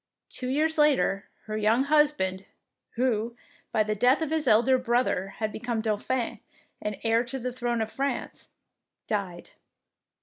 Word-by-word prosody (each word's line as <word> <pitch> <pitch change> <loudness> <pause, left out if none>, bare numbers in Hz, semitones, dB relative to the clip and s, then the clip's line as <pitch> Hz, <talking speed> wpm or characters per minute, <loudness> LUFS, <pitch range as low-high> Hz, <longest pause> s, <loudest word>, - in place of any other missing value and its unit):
Two 255 - -5
years 310 +4 +1
later, 200 -10 +3 0.2
her 215 - -4
young 215 +4 +3
husband, 280 -11 +2 0.5
who, 235 -2 0 0.4
by 215 - +3
the 215 0 -1
death 250 +9 +3
of 315 - -3
his 315 -3 0
elder 245 +4 +5
brother, 240 -6 +1
had 215 -1 -2
become 235 0 -3
Dauphin 225 +2 -1 0.4
and 210 -1 -3
heir 225 +1 +3
to 265 +3 -4
the 250 -1 -4
throne 240 -2 -1
of 220 - -7
France, 275 +1 -3 0.6
died. 190 -5 -3
235 Hz, 145 wpm, -27 LUFS, 215-260 Hz, 0.6 s, elder